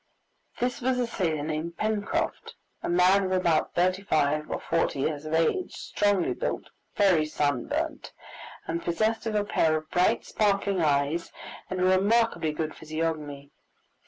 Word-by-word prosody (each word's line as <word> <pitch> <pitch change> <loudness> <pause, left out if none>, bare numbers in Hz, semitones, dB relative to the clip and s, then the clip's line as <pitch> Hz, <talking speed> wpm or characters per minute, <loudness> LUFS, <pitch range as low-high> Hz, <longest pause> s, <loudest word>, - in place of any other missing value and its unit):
This 250 +1 -1
was 255 +1 +1
a 250 - +1
sailor 165 -10 -1
named 160 +2 -4
Pencroft, 215 -1 -2 0.3
a - - -3
man 180 +3 +4
of 185 - -2
about 175 -4 +1
thirty 185 +2 +2
five 155 -5 +1
or - - -2
forty 165 -4 0
years 150 +1 -2
of 155 +1 -1
age, 165 - +1
strongly 205 -4 0
built, - - -4 0.2
very 190 -6 +4
sunburnt, 145 -4 -2 0.5
and 170 +1 -3
possessed 220 +7 0
of 220 - -2
a 205 - +2
pair 160 -6 +2
of 155 0 -9
bright 180 +1 +2
sparkling 200 -3 +1
eyes 145 +2 +1 0.4
and 185 - -3
a - - +1
remarkably 195 -1 +3
good 155 +1 -3
physiognomy. 155 -3 -4
170 Hz, 150 wpm, -27 LUFS, 155-200 Hz, 0.5 s, man